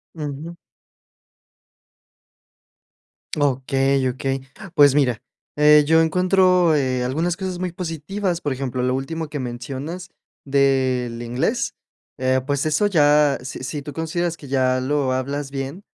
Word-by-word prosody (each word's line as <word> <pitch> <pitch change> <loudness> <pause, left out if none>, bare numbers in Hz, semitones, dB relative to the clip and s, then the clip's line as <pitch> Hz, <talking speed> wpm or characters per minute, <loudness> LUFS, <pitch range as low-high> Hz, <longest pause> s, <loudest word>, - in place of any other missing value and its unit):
Ujú. 155 +2 -6 2.8
Okey, 135 -1 +1
okey. 135 +1 -2 0.3
Pues 145 -2 +7
mira, 125 -6 +2 0.4
eh, 150 0 +6
yo 160 0 +5
encuentro 180 -1 +3
eh, 130 -3 0
algunas 160 +7 -1
cosas 190 -1 -4
muy 180 -1 -3
positivas. 175 +2 -3
Por 145 -2 -1
ejemplo, 130 -1 -3
lo 125 0 +1
último 160 +4 -3
que 145 0 -5
mencionas, 135 +8 -6 0.4
del 130 -4 +1
inglés, 120 +2 -1 0.5
eh, 130 0 +2
pues 145 +1 0
eso 155 +7 +2
ya 150 -6 +4
si 130 +1 -7
si 140 +2 -4
tú 145 - -7
consideras 165 +1 -2
que 145 - -12
ya 130 -1 +1
lo 135 -1 0
hablas 140 +2 -3
bien, 135 +7 -5
145 Hz, 130 wpm, -22 LUFS, 130-165 Hz, 2.8 s, Pues